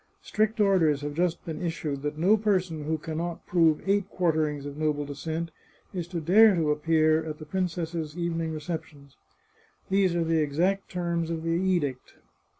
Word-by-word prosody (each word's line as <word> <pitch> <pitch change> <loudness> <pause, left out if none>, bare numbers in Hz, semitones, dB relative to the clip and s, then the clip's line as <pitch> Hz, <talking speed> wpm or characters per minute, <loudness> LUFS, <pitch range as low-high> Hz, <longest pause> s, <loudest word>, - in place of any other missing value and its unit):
Strict 215 +1 0
orders 175 -8 +3
have 145 0 -4
just 170 +2 -1
been 160 -2 -5
issued 160 -5 -3
that 150 +1 -3
no 185 +7 +4
person 185 -8 0
who 160 +1 0
can 155 +1 -5
not 170 0 -4
prove 165 -1 +2
eight 200 0 +1
quarterings 155 -5 0
of 145 -1 -6
noble 150 -1 -1
descent 160 +4 -4 0.4
is 175 -3 -4
to 175 -1 -4
dare 200 +6 +6
to 160 -3 +1
appear 155 +1 +2
at 155 -1 -5
the 155 - -9
princess's 165 -2 -3
evening 165 -2 -2
receptions. 155 -3 -7 0.8
These 190 -3 +3
are 170 - +1
the 165 -1 +2
exact 175 +7 0
terms 170 -2 -2
of 165 -1 -3
the 165 - -2
edict. 170 -7 -1
165 Hz, 170 wpm, -27 LUFS, 155-180 Hz, 0.8 s, dare